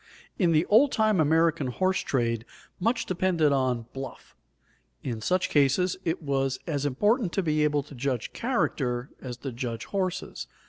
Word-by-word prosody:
In 175 -4 +4
the 160 +1 +3
old 255 +7 +5
time 215 -4 +2
American 160 -1 +3
horse 185 +9 +1
trade 115 -4 0 0.4
much 230 +5 +1
depended 175 -4 +2
on 130 -4 +1
"bluff"; 135 0 -8 0.7
in 115 -4 -4
such 180 +10 +1
cases 145 +6 +3
it 165 +1 -2
was 135 -2 0
as 145 -4 -1
important 205 - +1
to 195 - 0
be 155 -2 +1
able 150 -1 +2
to 145 - -14
judge 130 -2 -2
character 145 - -1
as 125 -2 -6
to 135 +2 -5
judge 120 -1 -4
horses. 185 -2 -3
150 Hz, 155 wpm, -27 LUFS, 130-185 Hz, 0.7 s, old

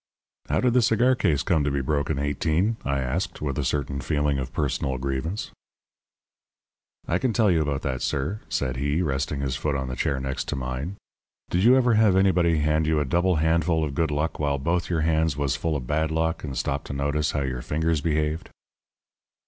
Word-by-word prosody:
"How - - +2
did 125 -2 +2
the 125 - +5
cigar 120 +3 +3
case 75 - +1
come 85 -6 +2
to 70 - +1
be 70 0 -1
broken, 70 +2 -1
Eighteen?" 80 +9 0
I 70 -1 -1
asked, 85 +8 -2
with 70 -2 -2
a - - 0
certain 70 0 -1
feeling 75 0 0
of 65 -1 -4
personal 70 -2 -1
grievance. 70 +9 -3 1.6
"I 85 - +1
can 125 -3 0
tell 110 -4 +3
you 80 -2 +3
about 75 -2 -2
that, 65 -2 -2
sir," 80 +10 -1
said 65 -1 -1
he, 70 +5 0
resting 70 -1 -1
his 65 -2 -1
foot 75 +2 -1
on 65 -1 -3
the 65 - -4
chair 70 +1 0
next 65 0 -3
to - - -2
mine. 65 +7 -4 0.6
"Did 90 +2 +2
you 125 +3 +7
ever 125 -2 +3
have 110 -3 +4
anybody 90 -4 +3
hand 75 +1 +1
you 80 -1 +2
a 75 - 0
double 90 +6 +2
handful 80 +1 +2
of 75 -3 -2
good 80 +2 0
luck 75 +2 -2
while 70 -2 +1
both 85 +5 -1
your 85 -3 0
hands 80 -2 +1
was 70 -2 0
full 80 +1 -1
of 65 -4 -3
bad 80 +4 0
luck, 80 +1 -1
and 70 -4 -5
stop 70 +3 -1
to - - -6
notice 70 +2 0
how 70 - 0
your 65 -2 -3
fingers 80 +3 0
behaved?" 75 0 -1
75 Hz, 205 wpm, -25 LUFS, 70-85 Hz, 1.6 s, you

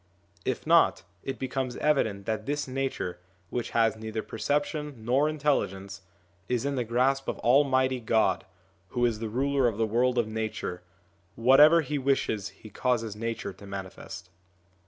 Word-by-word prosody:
If - - -2
not, - - +4 0.2
it 135 - -4
becomes 130 -1 -3
evident 110 -10 +1
that 110 -1 -3
this 145 0 -1
Nature, 130 -9 -3 0.3
which 120 - -2
has 115 -1 +2
neither 110 0 -5
perception 145 0 -2
nor 135 +5 +3
intelligence, 100 -11 -1 0.5
is 125 +1 0
in 140 - 0
the 125 -3 0
grasp 130 +4 +1
of - - -2
Almighty 130 0 +3
God 110 -4 +2 0.4
who 120 +6 0
is 115 -3 0
the 110 -1 -3
Ruler 135 +2 +1
of 110 -3 -2
the 115 - +2
world 125 +3 +1
of 120 -2 +2
Nature; 110 -5 -4 0.5
whatever 145 +8 +7
He 150 -2 -2
wishes 120 -7 0
He 100 +3 -14
causes 115 -2 -1
Nature 115 +1 -4
to 100 - -13
manifest. 95 -2 -8
120 Hz, 155 wpm, -28 LUFS, 110-135 Hz, 0.5 s, whatever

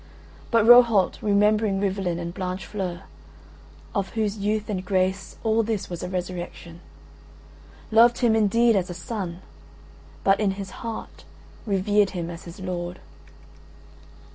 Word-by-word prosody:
But 230 -2 +3
Rohalt 235 -5 +6
remembering 210 0 +2
Rivalen 190 -3 -1
and 170 0 -5
Blanchefleur 185 0 -4 0.9
(of 200 -3 -1
whose 215 -2 -1
youth 210 +1 -1
and 195 -4 -3
grace 190 0 -1
all 225 0 +2
this 220 -4 -3
was 175 - -5
a 180 - -4
resurrection) 175 -2 -6 1.1
loved 235 +2 +6
him 235 -3 +3
indeed 225 +2 +3
as 185 -2 0
a 175 - -6
son, 180 -2 -5 0.8
but 195 0 +3
in 205 -3 +1
his 195 -1 -6
heart 230 -2 -7 0.4
revered 205 +1 +2
him 170 0 -3
as 170 - -10
his 170 +1 -10
lord. 180 -1 -5
195 Hz, 130 wpm, -24 LUFS, 180-215 Hz, 1.1 s, Rohalt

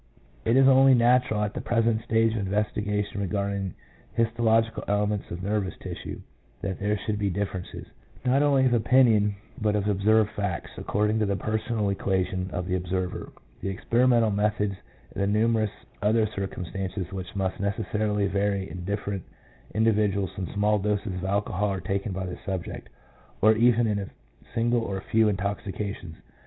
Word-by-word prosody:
It 115 +3 +4
is 135 0 +6
only 135 0 +7
natural 120 -3 +3
at 105 - -2
the - - -4
present 115 -1 +1
stage 115 -1 +2
of 100 -3 -2
investiga 105 0 0
tion 100 - -6
regarding 100 0 -2 0.4
histological 115 0 +2
elements 105 0 0
of 90 +2 -6
nervous 100 -2 -1
tissue, - - -7 0.4
that 95 -3 -3
there 105 +1 0
should 105 +1 -3
be 100 -1 +1
differences, 95 -1 -4 0.4
not 130 +3 +3
only 140 -2 +4
of 125 - +3
opinion, 110 -3 +4 0.3
but 105 -1 +2
of 105 -1 0
observed 105 +2 +3
facts, 100 -4 -3
according 105 +2 0
to 105 - +1
the 100 - +1
personal 110 0 -1
equa 95 -1 0
tion 95 0 -3
of 90 - -3
the 95 - -1
observer, 90 0 -3 0.3
the 95 - -2
experimental 115 +3 +3
methods, 105 0 +1 0.4
and - - -3
the 100 - +2
numerous 110 +1 +2 0.3
other 110 +2 +3
circumstances 95 -2 -4
which 95 -1 -6
must 95 -1 -2
neces 100 +2 -1
sarily 105 -1 +1
vary 100 0 0
in 90 -1 -6
different 100 0 -3 0.5
individuals 105 -3 +2
when 95 -2 -4
small 105 +1 +2
doses 105 0 -1
of 90 0 -4
alcohol 100 +1 0
are 95 - -2
taken 95 +4 -2
by 95 0 -3
the 90 - -6
subject, 95 -3 -5 0.5
or 110 +1 +5
even 120 +1 +4
in 105 -2 0
a 100 - -5 0.5
single 120 +1 +2
or 100 -4 -3
few 110 +3 +2
intoxications. 100 -3 -3
105 Hz, 165 wpm, -26 LUFS, 95-110 Hz, 0.5 s, only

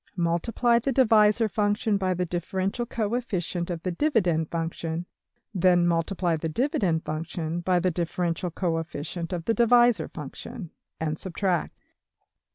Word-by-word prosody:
Multiply 205 +8 +2
the 270 +4 -1
divisor 220 -3 +4
function 205 0 +1
by 185 -2 0
the 180 +1 -1
differential 190 +6 -2
coefficient 205 -7 -2
of 170 -2 -4
the 185 - -1
dividend 175 - +1
function; 165 0 -3 0.5
then 180 -2 +4
multiply 170 +1 +1
the 160 +1 -3
dividend 185 - 0
function 160 +1 -3
by 180 +1 +1
the 180 +1 +1
differential 175 +1 -2
coefficient 165 -1 -3
of 170 -2 -3
the 225 - +2
divisor 240 0 +4
function; 160 - -8 0.3
and 155 -1 -2
subtract. 185 -1 -2
180 Hz, 130 wpm, -26 LUFS, 165-210 Hz, 0.5 s, divisor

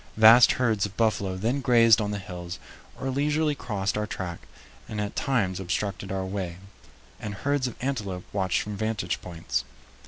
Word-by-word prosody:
Vast 115 +3 +8
herds 110 -5 +1
of 100 - -16
buffalo 100 -4 +1
then 120 +8 0
grazed 115 -3 +6
on 105 - -1
the 105 - -2
hills 90 -3 -7 0.4
or 135 - -2
leisurely 150 +3 +1
crossed 105 -8 -2
our 105 0 -1
track 90 -4 -6 0.4
and 105 - -4
at 105 -1 -3
times 110 -10 0
obstructed 95 +1 -3
our 95 -1 -2
way, 95 -3 -4 0.6
and 105 -1 -5
herds 140 +3 0
of 125 - -6
antelope 105 -9 -3
watched 95 -3 +1
from 105 0 -5
vantage 105 -4 -2
points. 85 -2 -3
105 Hz, 165 wpm, -26 LUFS, 95-120 Hz, 0.6 s, Vast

